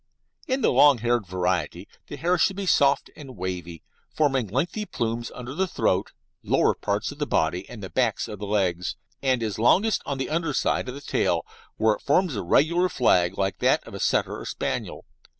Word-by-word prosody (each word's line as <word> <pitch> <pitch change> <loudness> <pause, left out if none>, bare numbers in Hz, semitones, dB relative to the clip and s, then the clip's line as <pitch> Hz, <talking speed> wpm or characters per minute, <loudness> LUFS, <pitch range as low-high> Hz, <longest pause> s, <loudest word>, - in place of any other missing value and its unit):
In 260 +1 0
the - - +3
long 145 -3 +6
haired 120 -2 0
variety 90 -3 -2 0.2
the - - -7
hair 175 +2 +1
should 190 - +2
be 200 0 -4
soft 140 -5 +3
and 135 -4 -11
wavy, 90 -3 -5 0.3
forming 135 -6 +1
lengthy 160 - -1
plumes 115 0 -3
under 125 +1 -7
the 190 +5 0
throat, - - 0 0.3
lower - - +2
parts 100 +4 -2
of 145 - -12
the 145 - -1
body, 85 +4 0
and 110 -4 -9
the 95 - -6
backs 120 -5 0
of 105 - -8
the 105 - -5
legs, 90 -4 0 0.3
and 130 -3 +1
it - - +1
is 105 -1 -4
longest 195 - +3
on 140 - -2
the 135 - -2
under 165 -2 0
side 130 - 0
of 125 - -6
the 140 - -8
tail, - - 0 0.3
where 110 0 +3
it - - -8
forms 165 0 +2
a 100 - -2
regular 170 - +3
flag 90 - +2
like 95 -2 -1
that - - +2
of - - -10
a - - -6
Setter - - 0
or - - -8
Spaniel. - - -4
120 Hz, 205 wpm, -25 LUFS, 95-145 Hz, 0.3 s, long